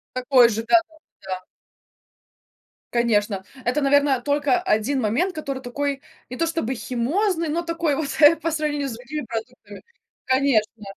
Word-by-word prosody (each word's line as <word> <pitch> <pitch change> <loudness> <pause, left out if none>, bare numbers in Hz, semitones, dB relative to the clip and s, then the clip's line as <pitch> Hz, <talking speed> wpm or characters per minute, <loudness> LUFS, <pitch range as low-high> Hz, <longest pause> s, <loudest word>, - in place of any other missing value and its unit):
Такой 250 -2 +5
же, 225 +1 -3 0.5
да-да-да. 185 -1 -7 1.5
Конечно. 210 -4 +1 0.2
Это, 265 +5 +1
наверно, 280 -2 +3
только 290 +5 +1
1 260 - 0
момент, 280 - 0
который 275 -4 -4
такой 275 +2 -3 0.3
не 250 - -7
то 330 - +1
чтобы 325 -6 -2
химозный, 325 - -1
но 335 +3 -1
такой 335 -3 -1
вот, 300 -1 -2
э, 300 +3 +8
по 330 - -2
сравнению 295 -2 -1
с 235 - -5
другими 260 +5 -6
продуктами. 225 -3 -7 0.4
Конечно 250 -5 +1
270 Hz, 135 wpm, -23 LUFS, 235-300 Hz, 1.5 s, э